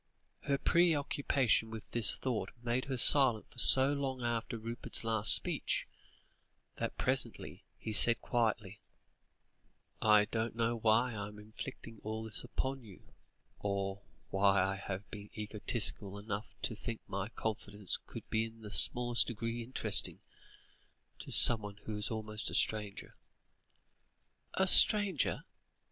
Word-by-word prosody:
Her 140 Hz, -, 0 dB
preoccupation 140 Hz, -8 st, +1 dB
with 110 Hz, -1 st, -8 dB
this 115 Hz, -3 st, +3 dB
thought 115 Hz, -7 st, -3 dB
made 120 Hz, +2 st, -2 dB
her 135 Hz, -2 st, -4 dB
silent 125 Hz, -3 st, +5 dB
for 125 Hz, -, -12 dB
so 135 Hz, +3 st, +6 dB
long 135 Hz, -3 st, -4 dB
after 115 Hz, 0 st, -3 dB
Rupert's 115 Hz, +2 st, 0 dB
last 110 Hz, -2 st, +3 dB
speech, -, -, +2 dB, 0.9 s
that -, -, -5 dB
presently -, -, -3 dB
he 110 Hz, -, -6 dB
said 115 Hz, +3 st, +5 dB
quietly: 110 Hz, -4 st, -2 dB, 1.2 s
"I 105 Hz, -1 st, +4 dB
don't 115 Hz, +1 st, -4 dB
know 115 Hz, 0 st, -1 dB
why 115 Hz, +2 st, +1 dB
I 100 Hz, -2 st, -5 dB
am 105 Hz, 0 st, -13 dB
inflicting 110 Hz, +1 st, -10 dB
all 110 Hz, +1 st, -6 dB
this 110 Hz, -1 st, -4 dB
upon 135 Hz, -1 st, -4 dB
you, 100 Hz, -5 st, -17 dB, 0.5 s
or 100 Hz, 0 st, -4 dB, 0.3 s
why 95 Hz, 0 st, +2 dB
I 95 Hz, +1 st, -2 dB
have 100 Hz, 0 st, -7 dB
been 105 Hz, -1 st, -10 dB
egotistical 105 Hz, -1 st, -1 dB
enough 105 Hz, +1 st, -6 dB, 0.2 s
to -, -, -1 dB
think 115 Hz, +1 st, -7 dB
my 100 Hz, +2 st, -5 dB
confidence 105 Hz, -3 st, -5 dB
could -, -, -10 dB
be 110 Hz, 0 st, 0 dB
in 115 Hz, 0 st, -13 dB
the 105 Hz, -1 st, -10 dB
smallest 120 Hz, +2 st, +2 dB
degree 115 Hz, 0 st, -5 dB
interesting, 125 Hz, +3 st, +3 dB, 1.0 s
to -, -, -9 dB
somebody 105 Hz, -3 st, +6 dB
who 110 Hz, -, -6 dB
is 105 Hz, 0 st, -3 dB
almost 110 Hz, -1 st, -5 dB
a -, -, -5 dB
stranger." 105 Hz, -2 st, -2 dB, 1.4 s
"A 190 Hz, -, +2 dB
stranger?" 200 Hz, -3 st, +4 dB
110 Hz, 135 wpm, -32 LUFS, 105-120 Hz, 1.4 s, so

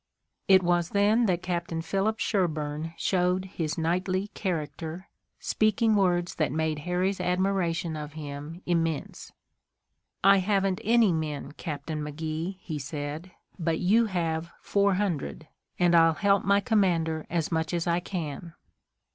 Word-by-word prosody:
It 190 Hz, -1 st, +6 dB
was 175 Hz, -1 st, +2 dB
then 215 Hz, +3 st, +4 dB
that 180 Hz, -2 st, 0 dB
Captain 170 Hz, -2 st, -2 dB
Philip 195 Hz, +6 st, 0 dB
Sherburne 160 Hz, -4 st, -1 dB
showed 180 Hz, 0 st, +1 dB
his 165 Hz, -4 st, -3 dB
knightly 185 Hz, +4 st, 0 dB
character, 165 Hz, 0 st, -4 dB, 0.3 s
speaking 215 Hz, +1 st, +2 dB
words 175 Hz, -3 st, +2 dB
that 155 Hz, -5 st, +1 dB
made 155 Hz, 0 st, -1 dB
Harry's 185 Hz, +2 st, 0 dB
admiration 180 Hz, -2 st, 0 dB
of 150 Hz, -1 st, -6 dB
him 150 Hz, +3 st, -7 dB
immense. 165 Hz, -3 st, -2 dB, 0.9 s
"I 195 Hz, +1 st, +7 dB
haven't 195 Hz, +1 st, +1 dB
any 230 Hz, -4 st, +4 dB
men, 155 Hz, -3 st, -3 dB
Captain 150 Hz, 0 st, -5 dB
McGee," 160 Hz, +4 st, -4 dB
he 155 Hz, -4 st, -5 dB
said, 145 Hz, +4 st, -5 dB, 0.3 s
"but 165 Hz, -1 st, 0 dB
you 220 Hz, +5 st, +3 dB
have 165 Hz, -3 st, -2 dB
four 200 Hz, -1 st, +2 dB
hundred, 175 Hz, -, -2 dB, 0.3 s
and 175 Hz, -1 st, +3 dB
I'll 165 Hz, -1 st, +6 dB
help 200 Hz, +2 st, +3 dB
my 200 Hz, +1 st, +3 dB
commander 170 Hz, -8 st, +1 dB
as 165 Hz, -1 st, -1 dB
much 160 Hz, -1 st, 0 dB
as 170 Hz, -2 st, -1 dB
I 170 Hz, 0 st, +2 dB
can." 170 Hz, -2 st, -5 dB
175 Hz, 135 wpm, -27 LUFS, 160-195 Hz, 0.9 s, I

